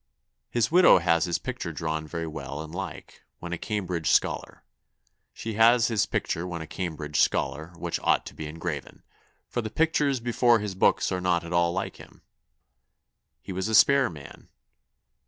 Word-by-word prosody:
His 120 +3 0
widowe 180 +2 +7
has 85 -2 +2
his 85 - 0
picture - - -5
drawne 80 -1 -3
very 85 +1 -4
well 80 -1 -6
and 80 0 -11
like, 90 -3 -7 0.2
when 85 0 -6
a - - -2
Cambridge 90 -6 -2
scollar. - - 0 0.7
She 115 - -6
has 115 +2 +5
his 110 -5 +1
picture 85 +2 -2
when 85 -2 -5
a 80 - -6
Cambridge 75 -3 -4
scollar, 80 +4 0
which - - -3
ought - - +2
to - - -9
be 80 - -7
engraven; 80 -2 -6 0.4
for 120 - -2
the 110 - -5
pictures 150 -1 +1
before 120 0 +3
his 105 -2 -4
books 95 - +2
are 90 -1 -1
not 90 -2 +1
at 85 +1 -6
all 85 0 +3
like 95 +2 -4
him.... - - -16 1.2
He - - -7
was 95 +2 -2
a 110 - +1
spare 140 +3 +6
man.... 75 -4 -12
90 Hz, 175 wpm, -26 LUFS, 80-110 Hz, 1.2 s, widowe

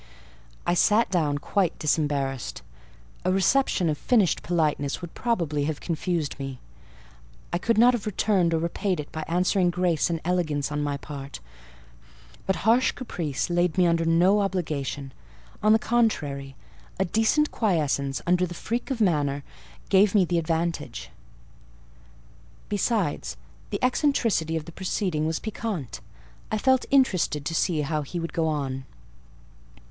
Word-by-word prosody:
I 175 - +2
sat 210 +4 +3
down 155 -6 +1
quite 180 +3 0
disembarrassed. 145 -4 -1 0.6
A 185 - +1
reception 195 0 +2
of 150 -2 -1
finished 220 -8 +2
politeness 150 -5 0
would 175 -2 -8
probably 165 -12 -1
have 155 -1 -2
confused 165 -3 -2
me: 135 -1 -5 1.0
I 175 - +1
could 230 +4 +1
not 245 +3 +6
have 225 -3 -3
returned 185 -4 +2
or - - +2
repaid 170 +2 -1
it 145 - -6
by 155 - -4
answering 180 +2 +2
grace 175 -3 +1
and 165 -1 -1
elegance 155 -5 0
on 150 0 -1
my 145 -1 -1
part; 140 -1 -8 1.1
but 190 0 -1
harsh 235 +3 +4
caprice 165 - -3
laid 175 -1 +1
me 180 - +5
under 165 -1 +2
no 175 +5 +4
obligation; 150 -8 -3 0.5
on 215 - +4
the 220 - +7
contrary, 150 - 0 0.4
a 190 - +2
decent 225 - +2
quiescence, 145 - 0
under 180 +1 +2
the 175 - -8
freak 235 +9 -3
of 255 -4 -2
manner, 145 -7 +1 0.5
gave 200 +1 +4
me 195 -3 +5
the 175 0 +1
advantage. 165 - -2 1.6
Besides, 205 -5 -1 0.3
the - - -2
eccentricity 235 - +1
of 155 - -5
the 170 - -9
proceeding 180 -3 -1
was 160 0 -1
piquant: 205 - -5 0.5
I 215 - +1
felt 260 +3 +2
interested 185 - +2
to 165 - -2
see 165 -1 +1
how 150 +1 -1
he 160 +5 -5
would 165 0 -5
go 165 -1 +1
on. 135 -4 -2
170 Hz, 145 wpm, -26 LUFS, 150-200 Hz, 1.6 s, the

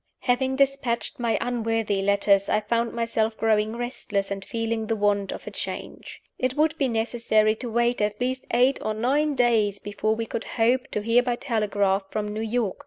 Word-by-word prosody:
Having 260 +1 +1
dispatched 275 -4 0
my 235 -2 +1
unworthy 225 -4 -1
letters, 200 0 +3
I 210 - +3
found 230 +2 -1
myself 225 -1 -1
growing 220 0 +1
restless, 210 -5 -3
and 195 0 -3
feeling 225 +1 -2
the 225 - 0
want 205 -2 +1
of - - -7
a - - -6
change. - - -7 0.2
It 255 0 0
would 310 0 +2
be 275 - +2
necessary 225 -2 +1
to 245 - -5
wait 235 +1 +1
at 210 0 -1
least 255 +1 -2
eight 250 +3 +3
or 215 - -2
nine 285 +6 +1
days 225 -5 +2
before 205 +2 -2
we 225 0 -3
could 225 - -5
hope 245 +3 +2
to 210 - -2
hear 230 +2 +4
by 245 -1 -1
telegraph 205 -6 0
from 210 0 -3
New 215 +1 -4
York. 225 -2 -1
225 Hz, 185 wpm, -25 LUFS, 210-245 Hz, 0.2 s, hear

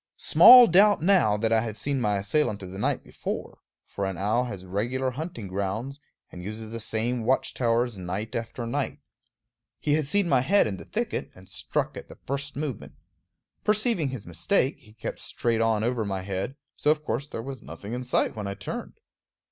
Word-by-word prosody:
Small 250 0 +9
doubt 200 0 +5
now 175 - +4
that 115 +1 +1
I 110 - +4
had 110 -2 -5
seen 140 -2 -1
my 105 -3 +1
assailant 105 +1 0
of 90 - -8
the 95 - -7
night - - 0
before; - - -6 0.3
for 100 -1 -3
an 95 -2 -4
owl 110 +6 +1
has 100 -6 -7
regular 120 +8 -1
hunting 140 - -6
grounds, 100 +9 -3 0.3
and 90 - -9
uses 110 +2 -7
the 115 - -5
same 115 +2 -2
watch 130 +4 +1
towers 120 -3 0
night 95 +5 -4
after 115 +1 -4
night. 115 - -2 0.8
He 145 - 0
had 150 -2 +1
seen 200 +4 +1
my 135 -6 +4
head 195 +10 +4
in 100 -3 -3
the - - -10
thicket, 230 +1 -3
and 95 0 -15
struck - - -2
at - - -8
the - - -13
first 140 +1 -3
movement. 140 -4 -5 0.7
Perceiving 210 - +1
his 130 -5 -7
mistake, 135 - 0
he 110 -6 -19
kept 110 - -6
straight 115 -1 -1
on 110 -1 +2
over 120 -1 0
my 95 -2 -3
head; 95 +6 -3 0.2
so - - 0
of 155 0 +2
course 140 +1 -2
there 115 - -6
was 135 -2 -7
nothing 85 +9 -8
in 125 +1 -3
sight 125 - +1
when 105 -2 -4
I 100 - -4
turned. 95 -2 -6
115 Hz, 195 wpm, -26 LUFS, 105-140 Hz, 0.8 s, Small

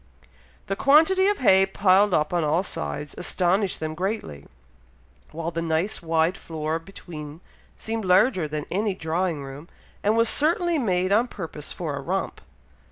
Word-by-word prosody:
The 195 - -2
quantity 320 - +4
of 410 0 +2
hay 190 -6 +5
piled 195 +1 +3
up 155 -1 +1
on 175 -2 +1
all 155 +4 +1
sides, 145 - -5
astonished 185 +2 0
them 155 0 -3
greatly, 180 - -4 0.8
while 165 +1 -4
the 165 0 -3
nice, 165 +6 -1
wide 165 +2 +1
floor 160 0 -3
between, 160 -4 -10 0.4
seemed 225 0 -4
larger 185 -1 +3
than 150 0 -4
any 205 +1 0
drawing 165 -2 -2
room, 140 +5 -10 0.3
and 215 +2 +2
was 230 0 +4
certainly 335 +5 +2
made 185 -5 0
on 225 +5 +3
purpose 160 -8 -7
for 155 -5 -4
a 140 - -5
romp. 190 +7 -3
180 Hz, 155 wpm, -24 LUFS, 160-205 Hz, 0.8 s, hay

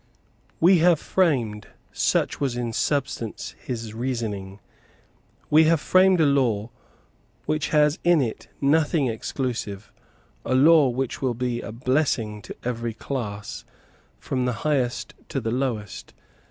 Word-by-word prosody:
"We 175 +2 +6
have 170 -1 +4
framed" 125 - 0 0.2
such - - 0
was 130 -4 -1
in 120 -2 -3
substance 120 -3 -2
his 115 -4 -5
reasoning, 110 -5 -4 0.9
"we 155 +2 +6
have 165 0 +3
framed 185 +3 +4
a 160 - +5
law 120 -6 +1 0.7
which 155 0 -1
has 150 0 +3
in 175 -2 +4
it 120 -5 -3
nothing 150 +1 +2
exclusive, 115 -3 -4 0.5
a 130 - 0
law 150 +1 +6
which 130 +1 -3
will 130 -3 0
be 120 0 -2
a - - -7
blessing 120 -3 0
to - - -9
every 115 -2 -3
class, 105 -5 -5 0.5
from 130 -1 -2
the 125 - 0
highest 120 -7 0 0.2
to 135 - -2
the 115 -2 -3
lowest. 120 -6 -3
125 Hz, 130 wpm, -24 LUFS, 115-150 Hz, 0.9 s, We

